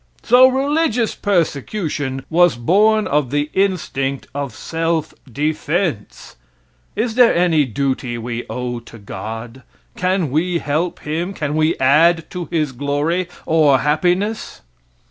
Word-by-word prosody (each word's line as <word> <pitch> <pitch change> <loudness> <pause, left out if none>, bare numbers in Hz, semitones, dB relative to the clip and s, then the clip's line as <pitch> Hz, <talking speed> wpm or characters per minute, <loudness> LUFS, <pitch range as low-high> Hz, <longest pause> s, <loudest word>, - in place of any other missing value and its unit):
So 250 +2 +7
religious 265 -3 +1
persecution 150 -6 -2
was 175 +1 +4
born 210 - +3
of 145 -3 0
the 145 +2 -1
instinct 155 -8 -1
of 140 -4 -4
self 165 -1 -2 0.2
defense. 155 - -2 0.6
Is 225 +1 -1
there 245 0 +5
any 170 -4 +3
duty 130 -1 -2
we 115 +1 -4
owe 125 -1 -4
to 115 0 -14
God? 110 +5 -7 0.3
Can 180 -5 0
we 170 +4 +1
help 165 +3 -2
him, 170 +6 -3
can 150 -3 -3
we 155 +1 +1
add 160 +5 +4
to 180 -2 -4
his 155 -4 0
glory 145 +7 -1 0.2
or 155 -4 +4
happiness? 180 - -1
155 Hz, 125 wpm, -19 LUFS, 135-180 Hz, 0.6 s, So